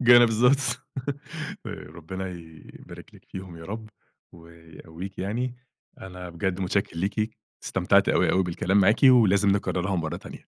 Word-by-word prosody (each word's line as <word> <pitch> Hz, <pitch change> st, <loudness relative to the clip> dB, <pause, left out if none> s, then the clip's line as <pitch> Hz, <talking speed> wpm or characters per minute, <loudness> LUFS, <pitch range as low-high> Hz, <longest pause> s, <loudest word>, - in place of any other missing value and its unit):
بالضبط. 125 Hz, +2 st, +5 dB, 0.8 s
ر -, -, -3 dB, 0.2 s
ربنا 95 Hz, +4 st, -6 dB
يبارِك 80 Hz, -3 st, -12 dB
لِك -, -, -17 dB
فيهم 95 Hz, -3 st, -9 dB
يا 80 Hz, -, -10 dB
رب، 110 Hz, +3 st, -6 dB, 0.4 s
ويقوِّيكِ 85 Hz, +2 st, -11 dB
يعني، 120 Hz, +6 st, -2 dB, 0.5 s
أنا 90 Hz, -1 st, -8 dB
بجد 90 Hz, +2 st, -2 dB
متشكِّر 95 Hz, -2 st, -1 dB
ليكِ، 105 Hz, +5 st, -2 dB, 0.3 s
استمتَعت -, -, +3 dB
أوي -, -, +3 dB
أوي 95 Hz, -, +3 dB
بالكلام 90 Hz, +3 st, +1 dB
معاكِ، 100 Hz, +6 st, +3 dB
ولازم 105 Hz, -6 st, +6 dB
نكررها 95 Hz, -1 st, 0 dB
مرَّة 80 Hz, 0 st, -2 dB
تانية. -, -, -10 dB
95 Hz, 130 wpm, -26 LUFS, 85-110 Hz, 0.8 s, ولازم